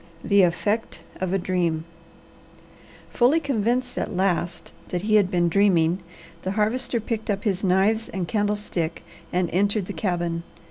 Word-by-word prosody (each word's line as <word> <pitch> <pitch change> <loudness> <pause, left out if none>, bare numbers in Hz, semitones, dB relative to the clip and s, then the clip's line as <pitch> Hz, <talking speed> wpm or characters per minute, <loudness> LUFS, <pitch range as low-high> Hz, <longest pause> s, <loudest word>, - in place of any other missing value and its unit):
THE 200 -1 +4
EFFECT 205 +6 0 0.2
OF 185 -1 -2
A 195 - +2
DREAM 175 -4 -1 1.3
Fully 255 +7 +4
convinced 250 -3 0
at - - -3
last 180 -2 -1
that 180 0 -3
he 215 +1 0
had 205 -3 +5
been 175 -1 +2
dreaming, 175 -2 +3 0.4
the 190 - -2
Harvester 235 +4 0
picked 220 0 -4
up 200 -1 -1
his 200 -3 0
knives 200 +4 +2
and 185 -3 -3
candlestick 205 -5 -1 0.3
and 180 0 +1
entered 200 +2 +1
the - - -6
cabin. 175 -3 -1
195 Hz, 145 wpm, -24 LUFS, 180-215 Hz, 1.3 s, had